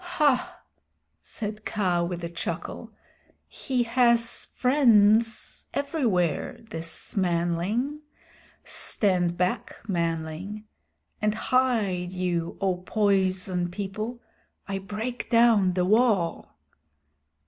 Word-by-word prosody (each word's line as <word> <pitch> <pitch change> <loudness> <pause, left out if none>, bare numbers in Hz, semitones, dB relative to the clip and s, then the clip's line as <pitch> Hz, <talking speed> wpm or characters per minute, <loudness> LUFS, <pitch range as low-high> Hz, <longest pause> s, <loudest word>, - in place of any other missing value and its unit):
"Hah!" 300 -7 0 0.6
said 210 -1 -6
Kaa 180 -6 0
with 175 0 -4
a - - -1
chuckle, 170 - -5 0.6
"he 255 -3 -1
has 235 -1 +2
friends 230 -4 +3
everywhere, 240 - 0
this 165 0 -6
manling. 185 - 0 0.6
Stand 180 -4 0
back, 180 +1 -1
manling. 170 +3 -3 0.6
And 210 0 +1
hide 220 -8 +1
you, 175 -2 -2
O 190 -2 +1
Poison 185 -2 +1
People. 210 +5 -5 0.5
I 195 -1 -2
break 220 +5 -5
down 230 -6 +5
the 180 0 +1
wall." 210 -4 +1
200 Hz, 90 wpm, -26 LUFS, 180-235 Hz, 0.6 s, down